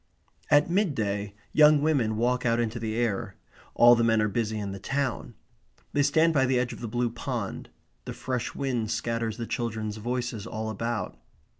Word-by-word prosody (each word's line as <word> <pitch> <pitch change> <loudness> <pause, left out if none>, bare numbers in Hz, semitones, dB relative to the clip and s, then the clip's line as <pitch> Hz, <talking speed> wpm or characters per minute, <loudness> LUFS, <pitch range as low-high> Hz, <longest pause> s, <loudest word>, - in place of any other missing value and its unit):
At 145 0 +5
mid 180 -3 +1
day 100 -1 -2 0.2
young 150 -1 +7
women 135 -8 +1
walk 125 +2 +1
out 115 -1 +2
into 120 0 -1
the 110 -1 -3
air. 115 -3 -1 0.4
All 120 0 +8
the 115 -1 +3
men 115 -1 +3
are 105 - +2
busy 110 +1 -1
in 100 -2 -4
the 95 - -7
town. 135 +3 -2 0.6
They 145 - +2
stand 160 +4 +3
by 135 -3 +3
the 130 0 +2
edge 125 0 -1
of - - -10
the 120 - -5
blue 120 +1 -1
pond. 120 -3 -4 0.4
The - - -5
fresh 125 -2 -3
wind 125 -5 -1
scatters 115 0 -2
the 115 - -4
children's 110 -3 -3
voices 120 -1 -3
all 110 0 -4
about. 110 - -3
115 Hz, 185 wpm, -27 LUFS, 110-125 Hz, 0.6 s, All